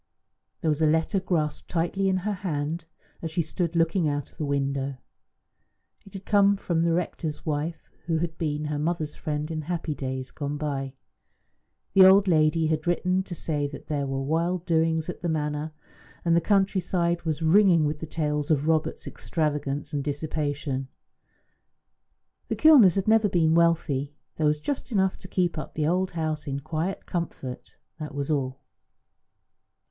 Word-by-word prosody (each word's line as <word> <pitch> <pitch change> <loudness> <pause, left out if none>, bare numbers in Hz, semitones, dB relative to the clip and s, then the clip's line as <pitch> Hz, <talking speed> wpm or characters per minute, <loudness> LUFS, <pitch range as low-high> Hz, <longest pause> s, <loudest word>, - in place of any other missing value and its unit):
There 160 - +1
was 150 +1 0
a 155 - +5
letter 160 +5 +2
grasped 165 -5 -2
tightly 180 +3 0
in 190 - +2
her 210 - 0
hand, 165 -3 -3 0.4
as 165 - -3
she 165 +2 0
stood 170 +2 -3
looking 165 +1 +2
out 145 -1 -3
of - - -26
the 155 - -1
window. 140 -1 -1 1.1
It 195 - -15
had 195 - -8
come 200 -1 +4
from 170 -4 -1
the 170 0 +2
rector's 165 -3 -3
wife, 155 +2 -3 0.2
who 165 -2 +1
had 165 0 -2
been 150 -2 -1
her 150 -1 -2
mother's 155 -1 -2
friend 150 +1 -3
in 155 -1 -2
happy 165 0 -3
days 130 -2 -4
gone 145 0 -4
by. 140 -3 -3 1.0
The 195 - +8
old 195 +1 +7
lady 160 -1 +3
had 155 +1 -1
written 180 +2 +1
to 190 -2 -7
say 150 -3 -1
that 140 - -10
there 145 -2 -1
were 135 0 -2
wild 170 +4 0
doings 160 -2 +1
at 180 - -6
the 175 - -1
Manor, 150 0 -2 0.5
and 170 -1 +4
the 170 - +4
country 195 +1 +2
side 170 -1 0
was 160 -1 -2
ringing 170 -1 +5
with 150 0 -2
tales 150 -2 -1
of 150 -1 +2
Robert's 160 -1 0
extravagance 150 -2 -2
and 145 -1 -1
dissipation. 145 -2 -2 1.6
The - - -1
Kilners 265 - +7
had 195 0 -1
never 220 -1 +4
been 160 -3 +3
wealthy; 155 -4 +2 0.2
there 155 - +2
was 150 0 +2
just 265 - -4
enough 190 -3 +1
to - - -11
keep 175 -3 0
up - - -8
the 155 - 0
old 185 +3 +1
house 155 -2 -2
in 140 0 -2
quiet 160 +5 -3
comfort, 160 -7 -5 0.2
and 155 -1 -5
that 140 - -13
was 140 +1 -2
all. 135 -3 -1
160 Hz, 175 wpm, -26 LUFS, 150-175 Hz, 1.6 s, The